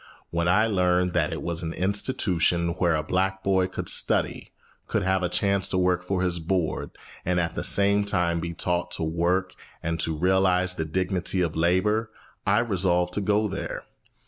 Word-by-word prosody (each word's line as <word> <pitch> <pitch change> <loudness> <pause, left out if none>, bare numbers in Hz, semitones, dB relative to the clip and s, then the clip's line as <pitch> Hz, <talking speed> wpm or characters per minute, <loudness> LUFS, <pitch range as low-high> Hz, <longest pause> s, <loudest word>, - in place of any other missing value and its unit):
When 85 0 0
I 105 +5 +4
learned 90 -4 +1
that 80 -4 +1
it - - -5
was 85 -1 -3
an 80 -1 -4
institution 90 -4 0
where 85 -1 +1
a 75 - -1
black 95 +4 -1
boy 95 -1 +2
could 95 - -6
study, - - +1 0.4
could - - 0
have 95 0 +1
a 90 - 0
chance 100 +1 +1
to 95 - -2
work 90 0 +1
for 95 0 -1
his 90 -1 -1
board, 85 0 -1 0.3
and 90 0 0
at 85 -1 -1
the - - -4
same 100 +1 +4
time 90 -4 0
be 85 +1 -4
taught 90 0 -1
how - - -1
to - - -3
work 90 +3 0 0.3
and 85 0 -2
to 80 -1 0
realise 90 +1 +2
the 80 -3 -3
dignity 90 +2 -1
of 85 -3 -1
labor, 95 +7 +1 0.4
I 105 +4 +4
resolved 90 -5 +1
to 105 - -1
go 105 +2 +1
there. 95 - -5
90 Hz, 190 wpm, -25 LUFS, 85-95 Hz, 0.4 s, I